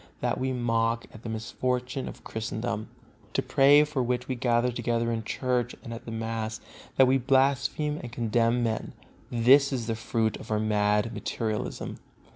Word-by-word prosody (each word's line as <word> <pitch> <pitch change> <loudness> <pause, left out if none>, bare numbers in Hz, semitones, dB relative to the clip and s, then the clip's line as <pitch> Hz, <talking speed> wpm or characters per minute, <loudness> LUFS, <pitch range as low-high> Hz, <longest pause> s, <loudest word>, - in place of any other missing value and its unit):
That - - 0
we 130 0 0
mock 115 -2 0
at 110 - -11
the 115 - -6
misfortune 125 +3 -2
of - - -9
Christendom, 110 0 -3 0.4
to - - +1
pray 145 +2 +6
for 150 -3 -1
which 125 0 -1
we 130 - -1
gather 120 0 +1
together 115 -1 0
in 115 -1 -2
Church 125 +1 -1
and 115 -3 -6
at 115 - -8
the 115 - -6
mass, 110 0 -3 0.4
that 130 - +8
we 130 +1 +3
blaspheme 135 +3 +2
and 120 - -7
condemn 115 +1 +1
men, 110 -1 -2 0.4
this 135 +4 +5
is 125 -4 -2
the 115 - -1
fruit 115 -1 -1
of 115 - -11
our 105 -1 +1
mad 105 +1 +1
materialism. 110 -2 -3
120 Hz, 170 wpm, -28 LUFS, 115-130 Hz, 0.4 s, that